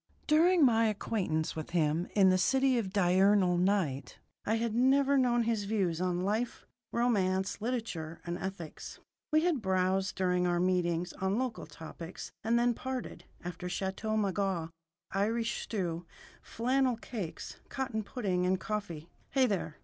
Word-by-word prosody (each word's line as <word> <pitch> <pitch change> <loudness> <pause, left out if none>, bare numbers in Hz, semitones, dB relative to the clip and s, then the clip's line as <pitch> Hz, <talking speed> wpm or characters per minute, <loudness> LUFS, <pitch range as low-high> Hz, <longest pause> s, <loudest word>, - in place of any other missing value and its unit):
During 330 +1 +5
my 230 -2 +4
acquaintance 190 -7 -1
with 155 -1 -5
him 165 0 +1
in 190 -2 +6
the 185 - +3
City 265 +5 +3
of 195 -5 -3
Diurnal 190 -1 +4
Night 170 -9 0 0.3
I 220 - +2
had 225 -1 -1
never 270 +3 +4
known 245 -3 +3
his 225 -3 0
views 190 -5 0
on 180 -1 0
life, 220 +4 -2 0.3
romance, 195 -5 +1
literature, 215 -10 -3
and 170 0 -3
ethics. 190 -5 -6 0.3
We 310 +1 +4
had 335 -8 +1
browsed, 190 0 +1
during 180 -1 +1
our 175 0 +1
meetings, 175 -1 +1
on 190 +2 +1
local 250 -7 -3
topics, 160 +2 -9
and 230 +2 +2
then 240 0 +3
parted, 260 +1 -5 0.2
after 180 +1 -5
Chateau 195 +4 -2
Margaux, 195 -5 -1 0.4
Irish 225 +4 0
stew, 175 -5 -3 0.3
flannel 255 +1 0
cakes, 215 -7 -6
cottage 255 -5 -2
pudding, 195 -7 -1
and 185 0 +1
coffee 200 -7 -4 0.2
(hey, 265 -1 +3
there! 190 -8 -2
195 Hz, 145 wpm, -31 LUFS, 180-235 Hz, 0.4 s, in